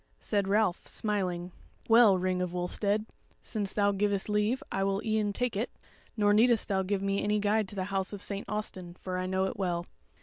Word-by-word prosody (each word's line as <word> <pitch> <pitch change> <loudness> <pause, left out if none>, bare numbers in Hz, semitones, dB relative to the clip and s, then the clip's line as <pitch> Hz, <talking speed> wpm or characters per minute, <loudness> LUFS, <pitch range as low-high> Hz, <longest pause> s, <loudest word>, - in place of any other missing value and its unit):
Said 200 -2 0
Ralph, 200 -2 +1
smiling: 185 -5 -2 0.4
"Well, 225 -4 +7
Ring 185 0 0
of 180 -1 -2
Wulstead, 200 +4 0 0.3
since 205 -4 -3
thou 205 -1 +2
givest 200 0 0
leave 210 +5 +1
I 195 - 0
will 195 0 +1
e'en 215 -2 +1
take 245 +2 -1
it, 220 +5 -1 0.5
nor 205 -1 +4
needest 230 +1 +4
thou 190 -1 +2
give 195 +1 -1
me 195 0 0
any 210 +1 +2
guide 210 0 +1
to 205 - -9
the 190 - -1
House 190 -1 0
of 205 - -6
St. 200 -1 -4
Austin, 185 -4 -5
for 185 -1 -3
I 185 - -2
know 190 0 +1
it 190 - -4
well. 175 -3 -1
200 Hz, 200 wpm, -30 LUFS, 190-210 Hz, 0.5 s, Well